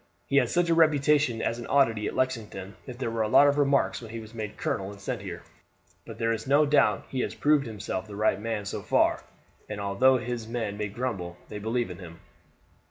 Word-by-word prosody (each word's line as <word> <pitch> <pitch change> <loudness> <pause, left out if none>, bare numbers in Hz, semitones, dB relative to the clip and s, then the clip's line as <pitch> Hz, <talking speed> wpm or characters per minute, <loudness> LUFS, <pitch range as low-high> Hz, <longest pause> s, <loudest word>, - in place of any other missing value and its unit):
He 140 - +1
had 125 -4 +4
such 175 0 +2
a 165 - +3
reputation 145 -6 +3
as 115 - -1
an 120 - -7
oddity 115 -7 +2
at - - -4
Lexington 105 -7 -3
that 125 - -7
there 125 -3 -3
were 115 -1 -1
a 110 - +1
lot 140 +6 +6
of 145 0 +3
remarks 140 -2 +2
when 115 - -9
he 115 +1 -6
was 110 0 -11
made 110 -2 -6
colonel 95 0 -2
and 100 -1 -11
sent 100 - -4
here; - - -7 0.6
but 115 - -8
there 115 0 +1
is 115 - -5
no 145 +3 +5
doubt 110 -9 +3
that - - -24
he 130 - -2
has - - -2
proved 145 -3 +2
himself 105 -3 -5
the 105 - -9
right 105 -1 +1
man 110 -2 -3
so - - -4
far, - - +2 0.5
and 105 -1 -5
although 100 +7 +3
his 120 -2 -4
men 115 -3 -3
may 105 0 -3
grumble 100 -6 -4
they 105 - -6
believe 115 0 -1
in 90 - -9
him. 85 -2 -11
115 Hz, 235 wpm, -27 LUFS, 105-130 Hz, 0.6 s, lot